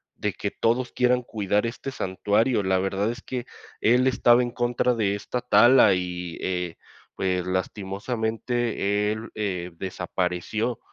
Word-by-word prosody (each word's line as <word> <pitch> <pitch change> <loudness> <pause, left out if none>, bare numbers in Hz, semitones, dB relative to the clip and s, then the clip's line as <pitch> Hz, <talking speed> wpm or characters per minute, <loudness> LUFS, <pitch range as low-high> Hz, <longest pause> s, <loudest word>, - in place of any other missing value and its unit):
de - - -2
que - - -3
todos 120 +2 0
quieran 125 0 +2
cuidar 105 -2 0
este 130 +3 -5
santuario, 105 +2 +1
la 95 -1 +2
verdad 95 +3 0
es 120 - -8
que 125 -1 -5 0.4
él 125 +3 +4
estaba 120 -1 +4
en 120 - -2
contra 120 0 +1
de 105 -3 +1
esta 120 +4 -4
tala 120 -1 +6
y, 90 -2 -4
eh, 90 -2 -2 0.4
pues, 90 -1 -1
lastimosamente, 105 +2 -1
él, 110 +1 -5
eh, 95 -5 -2
desapareció. 95 +5 -2
105 Hz, 135 wpm, -25 LUFS, 95-120 Hz, 0.4 s, tala